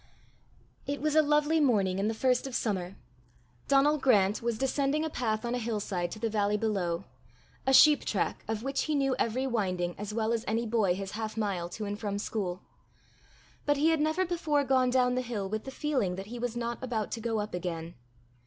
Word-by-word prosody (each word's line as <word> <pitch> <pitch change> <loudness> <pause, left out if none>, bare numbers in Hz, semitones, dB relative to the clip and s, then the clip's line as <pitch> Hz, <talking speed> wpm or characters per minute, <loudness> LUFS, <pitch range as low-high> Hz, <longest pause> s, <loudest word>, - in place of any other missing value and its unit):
It 285 +1 -2
was 305 0 0
a 310 - +7
lovely 300 +1 +2
morning 200 -10 +2
in 200 - +1
the 220 - -1
first 250 +2 +1
of 260 - -6
summer. 190 -5 -2 0.7
Donal 285 +2 +4
Grant 210 -6 +3
was 235 -1 -1
descending 275 +4 0
a 315 - -3
path 220 -3 -1
on 235 - -1
a 245 - 0
hillside 205 -6 -2
to 215 - -7
the 225 +1 -1
valley 210 -1 +1
below 190 -6 -1 0.6
a - - +4
sheep 295 +3 +7
track - - -1
of 220 0 -3
which 275 +1 -1
he 310 - 0
knew 270 -2 +2
every 245 +4 0
winding 185 -8 -1
as 205 0 -4
well 220 +1 0
as 230 -1 -1
any 225 +2 0
boy 215 -5 +2
his 195 0 -5
half 220 0 -5
mile 195 -5 -1
to 210 +4 -5
and 205 +1 -4
from 205 -3 -2
school. 195 -3 -3 1.0
But 290 0 +3
he 305 +3 +3
had 325 -1 +2
never 315 +5 +1
before 325 -5 0
gone 260 -2 +3
down 250 0 +3
the 255 - 0
hill 225 -6 -3
with 215 +2 -4
the - - -5
feeling 260 -9 -1
that 195 +1 -6
he 245 - -5
was 240 0 -3
not 235 0 -3
about 225 -5 -2
to 230 - -4
go 225 -1 -1
up 210 +1 -4
again. 170 -2 -4
230 Hz, 210 wpm, -29 LUFS, 205-270 Hz, 1.0 s, a